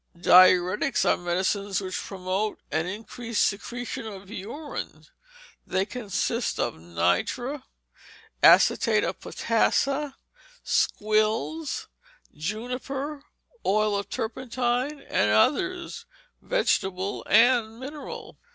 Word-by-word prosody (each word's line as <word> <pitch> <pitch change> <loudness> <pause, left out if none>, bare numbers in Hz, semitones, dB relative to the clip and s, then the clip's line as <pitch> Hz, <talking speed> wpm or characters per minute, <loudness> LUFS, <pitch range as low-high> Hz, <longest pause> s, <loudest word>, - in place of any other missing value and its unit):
Diuretics 185 +6 +5
are - - +4
medicines 190 +3 -1
which 185 -2 -5
promote 195 +2 -3
an 160 +2 0
increased 225 +3 -2
secretion 240 +4 -4
of 195 -1 -9
urine. 230 +9 -7 0.6
They 190 +1 0
consist 230 +1 -2
of 120 - 0
nitre, 90 - -1 0.8
acetate - - +5
of - - -3
potassa, 275 +5 0 0.5
squills, 215 +9 0 0.5
juniper, 250 - -4 0.4
oil 215 +1 +2
of 200 0 -3
turpentine, 250 +4 -2
and 105 - +1
others, 355 - +1 0.3
vegetable 195 - 0
and 230 0 +4
mineral. 285 +3 -8
220 Hz, 85 wpm, -26 LUFS, 190-260 Hz, 0.8 s, Diuretics